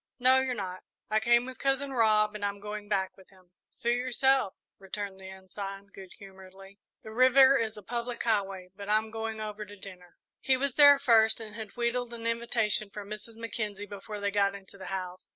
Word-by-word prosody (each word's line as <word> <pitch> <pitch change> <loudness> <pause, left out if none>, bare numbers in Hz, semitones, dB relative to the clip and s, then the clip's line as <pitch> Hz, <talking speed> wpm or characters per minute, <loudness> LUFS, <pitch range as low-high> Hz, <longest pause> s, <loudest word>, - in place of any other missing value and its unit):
"No, 260 +1 +5
you're 260 -1 -1
not; 185 -3 -5 0.3
I 215 - +4
came 240 +2 +3
with 260 0 -9
Cousin 275 0 0
Rob 215 -3 +3
and 210 -1 -7
I'm 200 0 -2
going 210 0 -7
back 195 -2 0
with 190 - -19
him." 185 -2 -23 0.2
"Suit 235 0 -1
yourself," 255 -2 +2 0.2
returned 195 0 -6
the 190 0 -9
Ensign, 195 +1 -8
good 190 -2 -11
humouredly, 195 0 -14 0.2
"the 220 - -9
river 260 +3 +6
is 220 -4 -1
a 210 - -10
public 240 0 -4
highway; 195 -5 -1
but 200 0 -8
I'm 215 +1 +2
going 225 0 -4
over 210 0 -5
to 205 0 -11
dinner." 180 -3 -13 0.2
He 260 -1 +2
was 275 0 -1
there 285 0 +8
first, 225 -5 +4
and 220 -2 -8
had 220 0 -8
wheedled 240 0 -1
an 230 0 -8
invitation 230 -3 0
from 205 0 -9
Mrs. 215 +2 -7
Mackenzie 215 -3 -4
before 205 +1 -8
they 200 0 -1
got 200 -1 +2
into 195 -1 -13
the 195 - -9
house. 185 -1 -5
215 Hz, 200 wpm, -29 LUFS, 195-235 Hz, 0.3 s, there